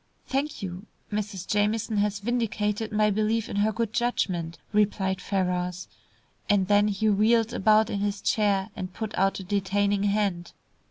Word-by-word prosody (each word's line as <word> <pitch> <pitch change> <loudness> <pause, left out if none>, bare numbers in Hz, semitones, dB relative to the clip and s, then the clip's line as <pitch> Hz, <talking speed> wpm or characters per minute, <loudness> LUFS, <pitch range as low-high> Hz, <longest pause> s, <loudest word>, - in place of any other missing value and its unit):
"Thank 275 -3 -2
you. 185 +2 -6 0.2
Mrs. 205 -3 -3
Jamieson 210 +1 0
has 205 0 0
vindicated 215 -2 -1
my 210 0 +2
belief 215 +2 0
in - - -4
her 210 +2 +2
good 225 0 -2
judgment," 180 -9 -1 0.2
replied 195 -2 +1
Ferrars, 180 -2 -2 0.6
and 200 -2 +3
then 205 +1 +4
he 210 +1 0
wheeled 225 +3 +3
about 215 +1 +3
in 200 - -2
his 200 0 -1
chair, 205 -1 +1
and 185 -3 -5
put 220 -2 -4
out 195 +1 +1
a - - -6
detaining 200 +1 0
hand. 200 -4 0
205 Hz, 155 wpm, -26 LUFS, 195-215 Hz, 0.6 s, then